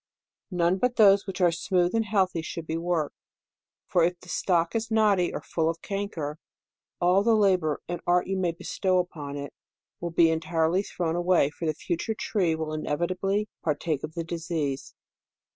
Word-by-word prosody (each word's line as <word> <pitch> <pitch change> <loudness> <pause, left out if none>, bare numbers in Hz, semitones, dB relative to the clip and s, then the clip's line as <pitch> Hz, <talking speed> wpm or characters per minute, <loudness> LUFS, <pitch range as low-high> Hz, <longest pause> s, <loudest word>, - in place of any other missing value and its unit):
None 180 0 +1
but 250 +2 +1
those 200 -2 +6
which 195 0 -4
are 175 -1 +5
smooth 175 +1 +1
and 225 -1 +1
healthy 190 -5 +1
should 165 0 -6
J>e 160 - -2
worked; 170 -3 -1 0.7
for 175 - +2
if 175 +1 +1
the 180 - -15
stock 170 -3 +1
is 225 0 -1
knotty 210 -5 +3
or - - -5
full 160 -1 0
of 165 - -5
canker, 170 -7 -4 0.6
all 180 +2 +4
the 225 +2 +4
labor 185 -7 +2
and 175 0 -4
art 175 0 +3
you 195 - -2
may 180 -2 +1
bestow 185 +2 -1
upon 150 -6 -3
it, 140 0 -6 0.5
will 175 - -3
be 165 0 +4
entirely 160 +2 +1
thrown 170 -4 -2
away; 175 -4 +3
for 165 +1 -5
the 155 - 0
future 175 +7 -2
tree 180 -7 0
will 155 -1 -3
inevi 155 +3 -1
tably 195 +3 0
partake 150 -1 -1
of 155 - -6
the 170 - -2
disease. 165 -5 -3
175 Hz, 180 wpm, -27 LUFS, 160-190 Hz, 0.7 s, those